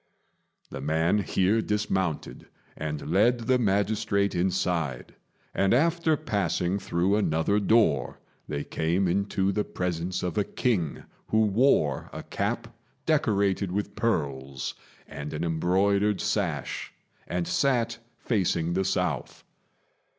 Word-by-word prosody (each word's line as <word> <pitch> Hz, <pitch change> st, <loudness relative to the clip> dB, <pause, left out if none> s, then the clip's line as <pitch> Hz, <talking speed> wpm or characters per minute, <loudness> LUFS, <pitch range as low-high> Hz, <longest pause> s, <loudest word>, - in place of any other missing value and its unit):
The -, -, -6 dB
man 80 Hz, +7 st, +2 dB
here 100 Hz, +2 st, +2 dB
dismounted 95 Hz, -6 st, -2 dB, 0.3 s
and 75 Hz, -1 st, -4 dB
led 120 Hz, +5 st, +3 dB
the 125 Hz, +2 st, +2 dB
magistrate 100 Hz, -1 st, +1 dB
inside; 85 Hz, -7 st, -1 dB, 0.4 s
and 95 Hz, +3 st, +3 dB
after 165 Hz, +2 st, +2 dB
passing 95 Hz, -3 st, -1 dB
through 90 Hz, +2 st, +1 dB
another 100 Hz, 0 st, +2 dB
door 105 Hz, -6 st, +2 dB, 0.3 s
they 75 Hz, -1 st, -3 dB
came 85 Hz, +4 st, 0 dB
into 100 Hz, +1 st, +1 dB
the 105 Hz, +2 st, 0 dB
presence 90 Hz, 0 st, -3 dB
of 90 Hz, +1 st, -1 dB
a -, -, +3 dB
king, 95 Hz, -, -1 dB, 0.2 s
who 110 Hz, 0 st, +3 dB
wore 100 Hz, -, +2 dB
a -, -, -7 dB
cap -, -, -3 dB, 0.3 s
decorated 100 Hz, -2 st, +1 dB
with 100 Hz, +2 st, -3 dB
pearls, 70 Hz, -, -2 dB, 0.3 s
and 70 Hz, +1 st, -6 dB
an 75 Hz, +2 st, -3 dB
embroidered 95 Hz, +5 st, +2 dB
sash, 95 Hz, -, -2 dB, 0.4 s
and 90 Hz, -1 st, -2 dB
sat 120 Hz, -4 st, +1 dB, 0.2 s
facing 85 Hz, -6 st, +1 dB
the 95 Hz, +1 st, 0 dB
south. 90 Hz, -5 st, -2 dB
95 Hz, 115 wpm, -27 LUFS, 85-105 Hz, 0.4 s, led